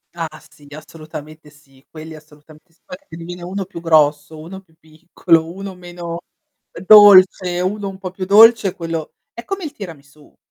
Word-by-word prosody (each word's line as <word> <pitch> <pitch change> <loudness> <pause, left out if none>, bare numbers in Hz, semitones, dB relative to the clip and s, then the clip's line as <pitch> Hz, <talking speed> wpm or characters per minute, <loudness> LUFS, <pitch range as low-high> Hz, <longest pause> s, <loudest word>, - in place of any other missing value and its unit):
Ah 165 -1 -4 0.2
sì 145 0 -21
assolutamente 155 0 -12
sì, 140 -2 -25
quelli 160 0 -11
assolutamente 155 +2 -19
sì, 165 - -36
poi 275 -2 -10
che 295 - -36
te - - -11
ne 170 - -10
viene 175 +1 -9
uno 190 +3 -6
più 180 -3 -11
grosso, 155 -1 +1
uno 175 +5 -11
più 165 -4 -32
piccolo, 165 +1 -2
uno 195 +2 -9
meno 175 -1 -9 0.7
dolce, 185 -3 +6
uno 200 +2 -3
un 190 - -11
po' 190 -1 -8
più 185 0 -7
dolce 215 0 +5
quello 165 -2 -6 0.2
è 235 - -10
come 390 -1 -6
il 305 - -6
tiramisù. 150 - -14
170 Hz, 175 wpm, -17 LUFS, 155-190 Hz, 0.7 s, dolce